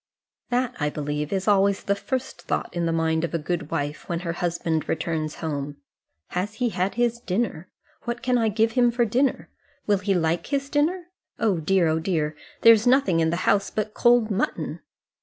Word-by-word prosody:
That, 250 0 0
I 150 -1 +1
believe, 150 0 -3
is 190 0 -1
always 200 -1 +3
the 200 - +1
first 250 +7 -4
thought - - -3
in 170 -1 0
the - - +1
mind 160 0 +1
of 170 - -2
a - - +3
good 160 -1 -3
wife 145 +1 -3
when 170 -1 -2
her 170 -2 -3
husband 170 -2 -2
returns 160 -1 -2
home. 145 -3 -4 0.5
Has 195 +4 -3
he 245 0 0
had 185 -1 -1
his 240 0 +1
dinner? 190 -5 -2 0.4
What 240 +1 -4
can 250 -1 +2
I 225 -2 +2
give 220 +2 +2
him 245 0 +4
for 240 0 +1
dinner? 250 +5 0 0.3
Will 205 -2 +2
he 200 -1 0
like 165 0 0
his 275 0 -2
dinner? 335 +4 0 0.3
Oh 205 -7 +1
dear, 180 +2 +2
oh 160 0 +1
dear! 160 -3 -1 0.3
there 230 - +9
is 220 +1 +1
nothing 250 -10 +4
in 160 0 +2
the 170 - 0
house 200 0 +3
but 215 0 -3
cold 240 -2 +4
mutton. 200 +3 -2
195 Hz, 195 wpm, -24 LUFS, 165-235 Hz, 0.5 s, there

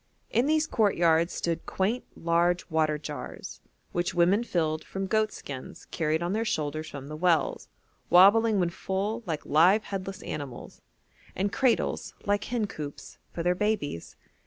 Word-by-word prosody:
In 240 +5 +2
these 310 0 +3
courtyards 170 - +2
stood 170 -1 -3
quaint, 210 +6 -1
large 170 +1 +1
water 155 -1 +2
jars, 150 0 -7 0.3
which 175 0 -1
women 180 +6 +4
filled 160 -7 -1
from 195 0 -4
goat 215 +2 +1
skins 130 -2 -8
carried 160 0 0
on 175 +2 -1
their 220 +2 0
shoulders 155 -6 -2
from 140 -1 -8
the 155 - -6
wells, 170 -1 +1 0.4
wobbling 205 +4 +6
when 175 -2 +1
full 195 +5 -2
like 160 -3 -3
live 180 +8 +5
headless 195 -1 -5
animals; 135 -5 -7 0.5
and 195 +2 -1
cradles, 255 -3 +1
like 205 0 +1
hencoops, 200 -12 -5
for 170 - -4
their 175 +1 +3
babies. 185 - -2
175 Hz, 145 wpm, -28 LUFS, 155-210 Hz, 0.5 s, wobbling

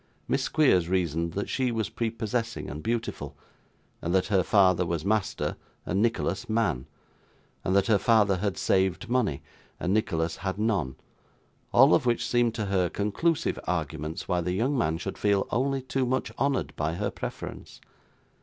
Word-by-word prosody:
Miss - - +1
Squeers 95 - +3
reasoned 85 -3 0
that 100 - -2
she 130 -2 0
was 110 -6 -1
prepossessing 115 +1 -2
and 75 +3 -6
beautiful, 115 +3 -3 0.6
and 85 +2 -1
that 95 - +3
her 95 - +5
father 95 -2 +4
was 85 -1 -2
master, 105 -1 0 0.3
and 95 +4 0
Nicholas 110 -4 0
man, 105 - 0 0.8
and 95 - +1
that 100 - +4
her 105 -3 +3
father 105 -4 +4
had 100 +1 -2
saved 95 +4 +1
money, 110 - +1 0.4
and 90 +2 0
Nicholas 85 -7 0
had 95 0 -3
none, 100 - 0 0.8
all 135 +5 +7
of 135 - +3
which 120 - +1
seemed 120 -2 +2
to 110 - -2
her 95 -3 +1
conclusive 155 +11 0
arguments 80 -2 -3
why 90 -2 +1
the 90 +1 -1
young 125 +9 +1
man 80 - +1
should 95 +3 -6
feel 100 -1 +2
only 135 +2 0
too 130 0 -1
much 130 +1 -1
honoured 140 -1 0
by 80 +2 -1
her 100 +2 -2
preference. - - -7
100 Hz, 165 wpm, -27 LUFS, 90-115 Hz, 0.8 s, all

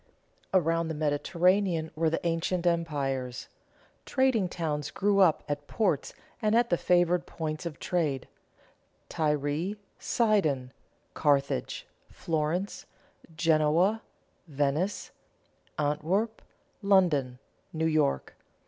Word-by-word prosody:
Around 165 -2 +2
the 160 - -3
Mediterranean 165 +3 +1
were 160 +1 +2
the 165 - -3
ancient 170 +1 0
empires. 140 -7 -1 0.6
Trading 260 -8 +1
towns 150 -4 -3
grew 200 0 +1
up 180 -5 +4
at 145 -1 -4
ports 190 -10 0 0.3
and 215 0 +2
at 235 0 +3
the - - +5
favored 175 0 +2
points 155 +1 -4
of 155 - -7
trade: 150 -7 -1 0.8
Tyre, 150 +5 -1 0.2
Sidon, 160 - +1 0.4
Carthage, 140 - 0 0.2
Florence, 165 +4 -2 0.5
Genoa, 165 +6 +3 0.5
Venice, 145 +6 -1 0.7
Antwerp, 170 +10 0 0.4
London, 170 -11 +3 0.3
New 160 0 -1
York. 155 - +1
165 Hz, 95 wpm, -28 LUFS, 150-185 Hz, 0.8 s, the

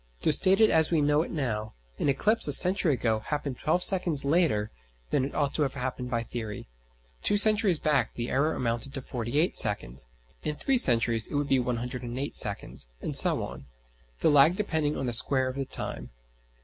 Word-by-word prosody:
To 155 - +2
state 190 +5 +3
it 220 - +4
as 160 -1 +3
we 165 - +1
know 150 +1 +2
it - - -5
now: 110 -8 -4 0.2
An - - 0
eclipse 210 +11 +4
a 145 - +6
century 180 0 +5
ago 110 -3 -1
happened 140 +1 -5
twelve 175 +4 +1
seconds 175 -7 +3
later 140 -9 0 0.4
than - - +1
it 135 - -6
ought 145 -2 -1
to - - -1
have 140 -2 -1
happened 125 -1 -5
by 115 -1 -2
theory; 110 -3 -7 0.5
two 205 - +1
centuries 210 -4 +3
back 140 -7 -1
the 120 0 -5
error 150 +4 0
amounted 120 +3 -3
to 135 - -5
forty 120 +1 -5
eight 165 +4 +2
seconds, 65 - -2 0.3
in 150 -1 -4
three 265 - +1
centuries 115 - +2
it - - -7
would 145 0 -2
be 135 - +2
108 125 +2 -4
seconds, 100 - 0
and - - -6
so - - +4
on; 70 - -9 0.5
the 160 - +3
lag 145 +4 +5
depending 160 -7 -2
on 135 - -4
the 120 - -2
square 130 +3 +1
of 130 - -5
the 135 0 -4
time. - - -5
140 Hz, 200 wpm, -27 LUFS, 120-155 Hz, 0.5 s, a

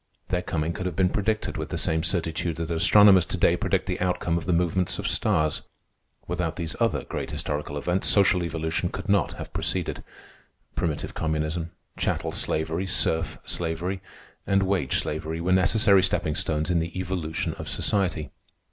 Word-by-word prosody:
Their 90 -1 0
coming 80 -2 -2
could 95 +2 -3
have 90 - -4
been 95 0 +2
predicted 110 +1 -1
with - - -4
the - - -3
same 80 0 +1
certitude 85 -1 0
that 85 0 -4
astronomers 95 +3 +7
to - - -3
day - - +4
predict - - 0
the - - -3
outcome 90 -2 0
of 85 -1 -3
the - - +2
movements 90 +1 +1
of - - -2
stars. 75 -1 +1 0.6
Without 80 -3 -2
these 85 -2 -3
other 115 -3 +1
great - - -5
historical 75 0 -3
events, 90 +6 0
social 95 -3 +4
evolution 80 +1 -2
could 95 +3 -6
not 100 -1 +2
have - - -8
proceeded. - - -2 0.7
Primitive 80 -3 -2
communism, 80 +1 -2 0.3
chattel - - -1
slavery, 80 +4 -1
serf 80 -3 +1
slavery, 90 +3 -2 0.5
and 95 0 +3
wage 95 -8 +1
slavery 80 +2 -3
were 90 +2 -1
necessary 100 +1 +5
stepping 90 -4 +1
stones 80 +1 -1
in 85 - +3
the 85 +3 -3
evolution 90 -4 -2
of - - -5
society. 90 -7 0
85 Hz, 165 wpm, -26 LUFS, 80-95 Hz, 0.7 s, astronomers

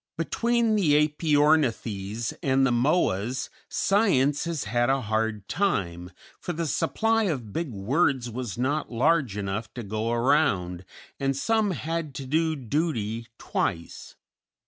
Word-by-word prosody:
Between 235 +7 +1
the 150 -6 +4
Æpyornithes 145 - +1
and 135 0 +3
the 130 - +2
Moas 125 - +1 0.2
Science 150 -10 +2
has 165 -4 -2
had 120 +3 +1
a 135 0 +2
hard 110 -2 -1
time, 90 - -1 0.3
for 175 - -4
the 165 +1 -2
supply 225 - +1
of 125 - -3
big 165 -5 -2
words 125 - +1
was 120 -2 -5
not 140 +4 -1
large 125 -2 +2
enough 100 +2 -3
to 120 - -5
go 110 +2 -2
around, 115 - +1 0.3
and 135 -1 0
some 220 +6 +1
had 165 -4 -3
to 135 - -5
do 160 +4 +1
duty 115 -5 -2
twice. 85 0 -3
135 Hz, 130 wpm, -26 LUFS, 110-160 Hz, 0.3 s, the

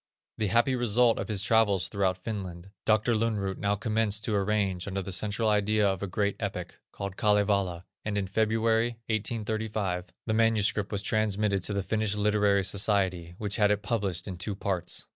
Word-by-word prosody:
The 110 - +1
happy 120 +6 +3
result 120 -1 +3
of - - -3
his 100 -3 0
travels 105 -6 +3
throughout 95 -2 0
Finland, 95 -3 -6
Dr. 110 +2 +3
Lönnrot 105 -4 -1
now 100 0 +1
commenced 110 0 0
to 110 - -1
arrange 100 -3 0
under 95 0 -3
the 95 - -6
central 105 +4 0
idea 105 0 +3
of 95 -2 -1
a 100 - -2
great 100 +2 0
epic, - - -5
called 100 -1 -6
Kalevala, 100 -4 +1 0.2
and 105 -1 -2
in 100 - 0
February, 110 +3 +1 0.2
1835, 110 -4 -2
the 110 - -1
manuscript 110 -2 +2
was 100 -2 -2
transmitted 105 -2 +1
to 105 - 0
the 100 -1 -1
Finnish 105 +1 0
Literary 105 -1 +2
Society, 95 -3 0
which 105 -1 -1
had 105 -2 +4
it 105 0 0
published 100 -5 -2
in 95 -3 -5
two 100 +2 -3
parts. 95 -3 -3
105 Hz, 175 wpm, -28 LUFS, 95-110 Hz, 0.2 s, had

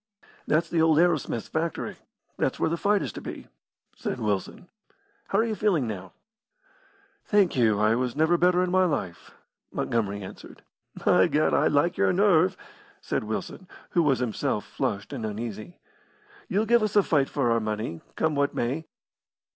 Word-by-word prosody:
"That's 160 +2 +2
the 165 - +1
old 160 -1 +4
Arrowsmith's 160 -9 +1
factory. 160 0 -3 0.4
That's - - -1
where 160 - +1
the - - +1
fight 200 +3 +1
is - - -5
to - - -7
be," - - -8 0.5
said - - -4
Wilson. 105 - -3 0.6
"How 195 - 0
are 220 - +4
you 230 -1 -1
feeling 200 -10 +1
now?" 105 -5 -6 1.1
"Thank 200 -6 +2
you, 110 -5 +3
I 105 +1 +3
was 125 +1 -1
never 160 +3 +3
better 180 +1 +3
in 180 - -1
my 185 0 +4
life," 120 - -3 0.4
Montgomery 100 -3 -2
answered. 95 - -11 0.4
"By - - +5
Gad, 150 - +1
I - - +3
like 150 +4 +2
your 95 - +3
nerve!" 185 -1 +3 0.4
said - - -3
Wilson, 110 - -5 0.2
who 175 - +3
was 145 -5 +3
himself 125 -4 -2
flushed 100 +6 -3
and 125 -5 -5
uneasy. 110 - -5 0.7
"You'll 210 +3 +1
give 235 +1 +4
us 215 -1 -1
a 205 - +6
fight 145 -6 +1
for 130 -5 0
our 115 - +3
money, 110 -5 -4
come 160 -1 +1
what 140 0 0
may. 140 +7 -2
150 Hz, 170 wpm, -26 LUFS, 115-180 Hz, 1.1 s, a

